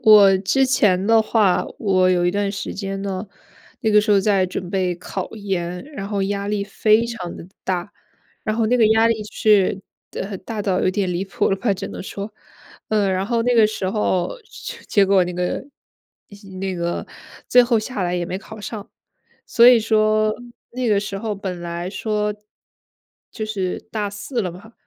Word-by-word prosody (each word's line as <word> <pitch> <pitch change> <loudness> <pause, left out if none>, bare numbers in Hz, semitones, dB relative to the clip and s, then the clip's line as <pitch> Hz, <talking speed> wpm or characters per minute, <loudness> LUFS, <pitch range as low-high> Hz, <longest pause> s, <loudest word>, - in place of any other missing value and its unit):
我 205 -3 +8
之 200 +8 +2
前 205 -7 +2
的 225 0 +5
话， 215 -4 +2
我 185 -3 +3
有 175 -1 +2
一 175 - +3
段 200 +1 -1
时 200 - -5
间 195 0 -4
呢， 195 +1 -4 0.5
那 220 - +1
个 210 0 +6
时 210 +1 -1
候 200 - +6
在 195 -2 +2
准 180 0 -5
备 185 -2 0
考 185 +1 -5
研， 180 -2 -3
然 195 -6 -6
后 200 -2 -1
压 200 +1 -2
力 205 -1 -1
非 215 +2 +3
常 185 -7 -6
得 170 - -10 0.2
大。 185 +1 -3 0.5
然 215 -1 -2
后 230 - +2
那 245 - +3
个 220 - +6
压 220 +1 +4
力 225 -2 +1
是 200 -3 +3 0.3
的， 195 -1 -5
大 220 -3 -5
到 190 -3 +1
有 - - +2
点 190 -2 -1
离 175 +3 -2
谱 195 - 0
了 195 - +1
吧， 200 -1 0
只 - - -5
能 - - -7
说， 200 +2 -6 0.6
嗯， 205 -3 +2
然 190 +1 -1
后 230 0 +1
那 245 +1 +2
个 225 -2 +6
时 195 -3 -3
候 210 - 0
就 - - -9
结 200 - +4
果 195 -1 +4
那 180 - -4
个 180 0 -2 1.0
那 190 -1 -2
个 170 0 -3 0.4
最 250 - +8
后 235 -2 +2
下 215 -2 -4
来 175 0 -1
也 175 - -1
没 185 +2 -4
考 220 +1 -11
上。 205 0 -7 0.6
所 235 0 +6
以 245 -2 +7
说 215 -1 +2 0.4
那 250 -1 -2
个 205 - +3
时 200 -1 -4
候 215 0 -3
本 190 -3 -5
来 170 +1 -4
说， 210 0 -1 1.0
就 215 - -5
是 195 -4 -2
大 210 -2 -1
四 205 +5 -4
了 185 -5 -2
嘛， 205 +6 -13
200 Hz, 210 characters per minute, -21 LUFS, 185-215 Hz, 1.0 s, 我